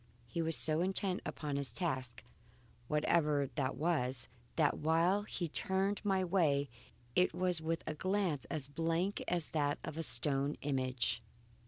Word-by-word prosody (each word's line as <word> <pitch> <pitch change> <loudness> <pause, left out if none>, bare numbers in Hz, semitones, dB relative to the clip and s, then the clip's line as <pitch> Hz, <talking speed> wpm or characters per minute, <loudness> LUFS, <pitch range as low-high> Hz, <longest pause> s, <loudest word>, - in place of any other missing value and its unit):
He 145 +8 -3
was 165 0 +2
so 155 +1 +2
intent 190 0 0
upon 145 -2 -3
his 140 -1 -3
task, 130 -9 -3 0.6
whatever 150 -2 +2
that 130 +1 -1
was, 135 -7 0 0.3
that 155 -3 +2
while 165 +6 +3
he 190 -4 -4
turned 190 +5 +2
my 190 -2 +2
way, 150 -7 +2 0.4
it 180 - +3
was 180 -3 +1
with 165 +1 -2
a 155 - -2
glance 185 - 0
as 140 +2 -4
blank 165 +6 -1
as 170 -3 0
that 145 -2 0
of 155 - -5
a - - +1
stone 140 +1 +1
image. 130 -4 0
160 Hz, 150 wpm, -35 LUFS, 140-180 Hz, 0.6 s, while